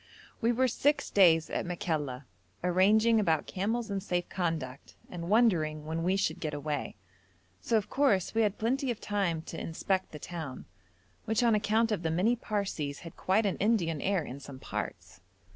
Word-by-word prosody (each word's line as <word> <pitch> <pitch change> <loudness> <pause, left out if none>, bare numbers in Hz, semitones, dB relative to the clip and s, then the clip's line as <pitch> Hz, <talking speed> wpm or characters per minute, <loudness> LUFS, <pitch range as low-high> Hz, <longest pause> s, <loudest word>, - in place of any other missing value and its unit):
We 230 +1 +3
were 255 +2 +2
six 290 +4 +1
days 165 -5 +5
at - - -1
Makalla 150 -7 -3 0.4
arranging 210 +6 +4
about 165 -7 +1
camels 220 +3 -2
and 195 -1 -1
safe 180 -2 -2
conduct, 160 -8 -3 0.2
and 170 -1 -5
wondering 165 -9 +3
when 160 +1 -2
we 185 +3 +2
should 185 -3 0
get 155 -3 -3
away; 145 0 -3 0.7
so 230 - +2
of 210 - -1
course 245 -10 +2
we 225 - +2
had 210 -2 +1
plenty 260 +4 0
of 235 -3 -2
time 190 -6 -1
to 165 - -7
inspect 190 +3 -1
the 150 - -7
town, 155 -4 -7 0.6
which 220 +2 +1
on 235 -2 +4
account 220 +2 +2
of 210 - 0
the 165 - -1
many 185 +9 +2
Parsees 195 -11 -3
had 165 -1 -10
quite 205 +4 +1
an 195 - 0
Indian 175 -8 +1
air 195 -4 +1
in 135 - -7
some 140 -1 -10
parts. 95 -7 -6
185 Hz, 175 wpm, -30 LUFS, 160-220 Hz, 0.7 s, days